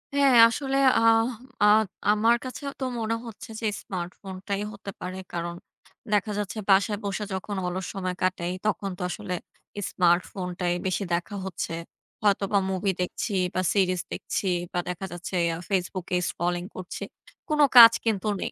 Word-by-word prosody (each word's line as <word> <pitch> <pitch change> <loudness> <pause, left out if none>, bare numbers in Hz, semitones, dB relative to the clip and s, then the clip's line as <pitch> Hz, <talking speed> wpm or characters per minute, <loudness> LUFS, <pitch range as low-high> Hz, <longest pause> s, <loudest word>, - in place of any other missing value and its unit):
হ্যাঁ, 280 -2 +5
আসলে 270 +3 -1 0.2
আহ 225 0 +5 0.4
আ - - +7 0.5
আমার 220 +3 +4
কাছেও 270 +2 -5
তো - - -3 0.2
মনে 225 0 0
হচ্ছে 230 +1 -10
যে 225 - 0
স্মার্টফোনটাই 190 +2 -5
হতে 200 0 -8
পারে। 185 +1 -5 0.2
কারণ 170 0 -3 0.6
দেখা 210 +1 +2
যাচ্ছে 205 +1 -3
বাসায় 200 +2 +4
বসে 200 +1 -2
যখন 190 +2 -4
অলস 180 +1 -3
সময় 185 -2 -3
কাটাই 180 -1 0
তখন 205 -2 0
তো - - -9
আসলে 180 +1 -4 0.6
স্মার্টফোনটাই 180 0 +1
বেশি 190 +2 0
দেখা 175 +4 -2
হচ্ছে। 180 -3 -4 0.5
হয়তোবা 200 -1 +2
মুভি 190 +1 0
দেখছি 180 +4 -3 0.2
বা 185 - +2
সিরিজ 185 -3 +2
দেখছি - - -3 0.3
বা 180 - 0
দেখা 180 +2 -4
যাচ্ছে 175 +2 -6 0.2
আ - - -6
ফেসবুকে 185 -2 -1
স্ক্রলিং 175 0 -2
করছি. 185 -1 -6 0.5
কোন 305 -1 0 0.2
কাজ 230 -1 +12
কিন্তু 215 -3 0
নেই। - - -2
195 Hz, 150 wpm, -26 LUFS, 180-215 Hz, 0.6 s, কাজ